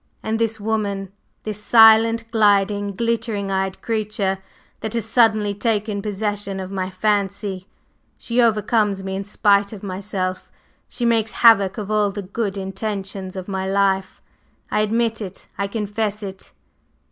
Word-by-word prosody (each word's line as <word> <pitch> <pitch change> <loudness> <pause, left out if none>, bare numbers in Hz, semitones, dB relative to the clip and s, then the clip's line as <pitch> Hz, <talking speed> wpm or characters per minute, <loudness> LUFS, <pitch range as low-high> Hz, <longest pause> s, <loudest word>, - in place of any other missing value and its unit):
And 220 +1 -1
this 225 -1 0
woman, 205 -3 -2 0.3
this 210 -1 -5
silent, 225 0 +6
gliding, 205 -2 +2
glittering 225 -3 -1
eyed 190 0 -2
creature 210 -4 -1 0.4
that 220 +1 -4
has 230 -3 0
suddenly 220 -3 +3
taken 210 -1 -1
possession 205 -1 -3
of 190 0 -6
my 185 -1 -2
fancy 200 -1 -1 0.5
she 240 +1 0
overcomes 210 -3 +2
me 190 0 -4
in 195 - -3
spite 200 0 +2
of 210 - -10
myself; 185 -1 -4 0.4
she 240 - -3
makes 225 -2 +2
havoc 210 -5 +5
of 210 -1 -4
all 210 -1 +2
the 200 +1 -5
good 200 +1 -3
intentions 195 -1 -4
of 185 -1 -6
my 190 -1 -3
life. 195 -1 0 0.5
I - - +1
admit 225 +1 0
it 195 -2 -8
I 200 - -2
confess 210 0 -3
it!" 190 -1 -8
205 Hz, 145 wpm, -21 LUFS, 195-220 Hz, 0.5 s, silent